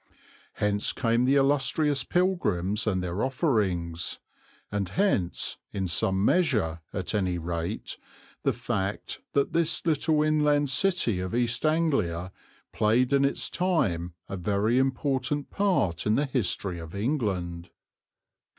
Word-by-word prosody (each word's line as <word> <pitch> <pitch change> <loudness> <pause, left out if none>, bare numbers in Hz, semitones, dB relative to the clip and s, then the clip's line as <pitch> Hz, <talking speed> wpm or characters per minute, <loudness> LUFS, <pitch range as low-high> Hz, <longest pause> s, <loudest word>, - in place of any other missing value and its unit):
Hence 105 0 0
came 115 +1 +1
the 135 +2 +3
illustrious 140 +1 +2
pilgrims 110 - 0
and 95 -3 +1
their 90 +3 -2
offerings, 100 - 0 0.5
and 100 -3 -2
hence, 135 - 0
in 95 -2 -2
some 95 +3 +1
measure 110 - +2
at 95 0 -3
any 95 -4 0
rate, 85 0 -4 0.4
the - - +2
fact 95 +2 -3
that 140 -1 +1
this 165 0 +1
little 155 -1 +2
inland 150 -2 +2
city 155 - +2
of 95 +4 -3
East 120 +4 +1
Anglia 110 - 0 0.4
played 125 +5 +2
in 140 0 +4
its 140 - 0
time 90 - 0
a 100 - -5
very 105 +6 +1
important 135 +1 -1
part 175 - +1
in 105 - +3
the 145 - +2
history 100 -8 -1
of 80 +2 -9
England. 95 - -2
115 Hz, 125 wpm, -27 LUFS, 90-145 Hz, 0.5 s, in